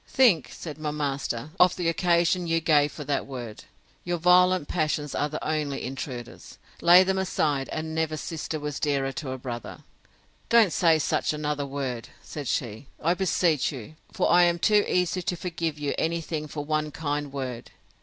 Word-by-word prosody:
—Think, 225 Hz, -, +4 dB
said 155 Hz, -2 st, -8 dB
my 155 Hz, -1 st, -2 dB
master, 140 Hz, -3 st, -3 dB
of 180 Hz, 0 st, +5 dB
the 175 Hz, -2 st, -2 dB
occasion 175 Hz, +1 st, +2 dB
you 165 Hz, 0 st, +2 dB
gave 150 Hz, -2 st, +3 dB
for 150 Hz, -, -7 dB
that 140 Hz, 0 st, -2 dB
word. 120 Hz, -5 st, -8 dB, 0.4 s
Your 175 Hz, 0 st, -1 dB
violent 180 Hz, -1 st, +4 dB
passions 155 Hz, -2 st, -1 dB
are 145 Hz, -, 0 dB
the 155 Hz, -, -5 dB
only 150 Hz, -3 st, -2 dB
intruders! 130 Hz, -2 st, -7 dB, 0.2 s
Lay 175 Hz, +2 st, +8 dB
them 190 Hz, 0 st, 0 dB
aside, 150 Hz, -7 st, 0 dB
and 160 Hz, 0 st, -4 dB
never 160 Hz, -1 st, -1 dB
sister 155 Hz, 0 st, -4 dB
was 150 Hz, -1 st, -4 dB
dearer 140 Hz, -2 st, 0 dB
to 130 Hz, +2 st, -6 dB
a 130 Hz, -, -4 dB
brother. 120 Hz, -2 st, -7 dB, 0.7 s
Don't 230 Hz, -6 st, +5 dB
say 165 Hz, -2 st, +4 dB
such 155 Hz, -, 0 dB
another 150 Hz, -1 st, -2 dB
word, 135 Hz, -4 st, -4 dB
said 145 Hz, -3 st, -7 dB
she, 115 Hz, +2 st, -3 dB
I 170 Hz, +3 st, +2 dB
beseech 175 Hz, -5 st, +1 dB
you; 130 Hz, 0 st, -9 dB, 0.2 s
for -, -, +1 dB
I 175 Hz, +1 st, +7 dB
am 175 Hz, -1 st, +4 dB
too 210 Hz, +3 st, +4 dB
easy 180 Hz, 0 st, +1 dB
to 180 Hz, -, -2 dB
forgive 165 Hz, -3 st, -3 dB
you 145 Hz, -1 st, -2 dB
any 170 Hz, +1 st, 0 dB
thing 155 Hz, -1 st, -4 dB
for 145 Hz, -1 st, -5 dB
one 155 Hz, 0 st, 0 dB
kind 145 Hz, -1 st, -3 dB
word! 130 Hz, -4 st, -5 dB
155 Hz, 180 wpm, -26 LUFS, 140-170 Hz, 0.7 s, Lay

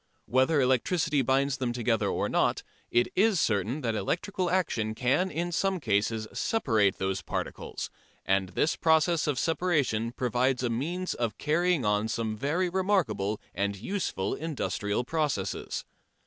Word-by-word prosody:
Whether 130 Hz, +5 st, +3 dB
electricity 140 Hz, +4 st, +2 dB
binds 135 Hz, +1 st, +1 dB
them 125 Hz, -2 st, -1 dB
together 120 Hz, -2 st, +1 dB
or -, -, 0 dB
not, -, -, +1 dB, 0.3 s
it 120 Hz, +1 st, +2 dB
is 205 Hz, -2 st, +3 dB
certain 110 Hz, -, 0 dB
that 115 Hz, -3 st, -1 dB
electrical 180 Hz, -, -1 dB
action 115 Hz, -12 st, 0 dB
can 135 Hz, +10 st, +1 dB
in 170 Hz, +3 st, -2 dB
some 190 Hz, +2 st, 0 dB
cases 110 Hz, -3 st, 0 dB
separate 110 Hz, -, +1 dB
those 95 Hz, 0 st, -1 dB
particles, -, -, -5 dB, 0.3 s
and 95 Hz, -1 st, +1 dB
this 150 Hz, -, +1 dB
process 160 Hz, 0 st, +3 dB
of 145 Hz, -3 st, 0 dB
separation 145 Hz, -9 st, +1 dB
provides 125 Hz, +1 st, 0 dB
a 120 Hz, -, 0 dB
means 170 Hz, +10 st, -2 dB
of 120 Hz, -3 st, -2 dB
carrying 165 Hz, -2 st, +1 dB
on 105 Hz, +1 st, +2 dB
some 110 Hz, -1 st, -2 dB
very 150 Hz, -, 0 dB
remarkable 175 Hz, -, 0 dB
and 100 Hz, +2 st, -1 dB
useful 110 Hz, -, -2 dB
industrial 125 Hz, -8 st, -2 dB
processes. 140 Hz, -, -2 dB
130 Hz, 140 wpm, -28 LUFS, 110-165 Hz, 0.3 s, Whether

